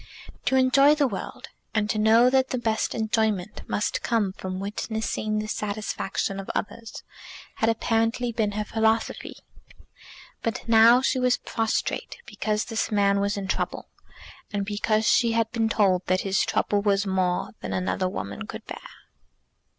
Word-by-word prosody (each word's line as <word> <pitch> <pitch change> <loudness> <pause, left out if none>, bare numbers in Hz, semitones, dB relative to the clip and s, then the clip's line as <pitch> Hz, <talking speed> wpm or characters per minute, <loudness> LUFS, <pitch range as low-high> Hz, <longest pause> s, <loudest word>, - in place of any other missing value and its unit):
To 265 - +2
enjoy 275 +3 +5
the 295 -2 +2
world, 200 -6 -7 0.3
and 210 -1 +1
to 215 - -1
know 225 +3 +5
that 265 0 +3
the 255 - -1
best 225 -2 -1
enjoyment 220 -3 -1
must 210 - -1
come 215 -5 0
from 185 -1 -5
witnessing 215 +1 -3
the 215 - -2
satisfaction 205 -2 -3
of 195 - -7
others, 225 +2 -5 0.5
had 225 - +2
apparently 230 +2 0
been 220 -3 -1
her 210 +1 -1
philosophy. 220 +1 0 1.1
But 230 +1 -3
now 230 +2 +6
she 260 - +1
was 250 -1 +2
prostrate 225 -1 -2
because 215 0 -2
this 225 -1 -2
man 200 -1 +3
was 200 +1 0
in 195 -1 -4
trouble, - - -3 0.6
and 200 -1 -2
because 215 +1 0
she 230 -1 +3
had 225 -1 +1
been 225 -2 0
told 190 -4 +2
that 185 0 +2
his 195 0 0
trouble 205 -1 +1
was 200 0 +1
more 185 -2 0
than - - -5
another 185 0 -1
woman 100 - -6
could - - -8
bear! - - -7
215 Hz, 155 wpm, -25 LUFS, 200-230 Hz, 1.1 s, now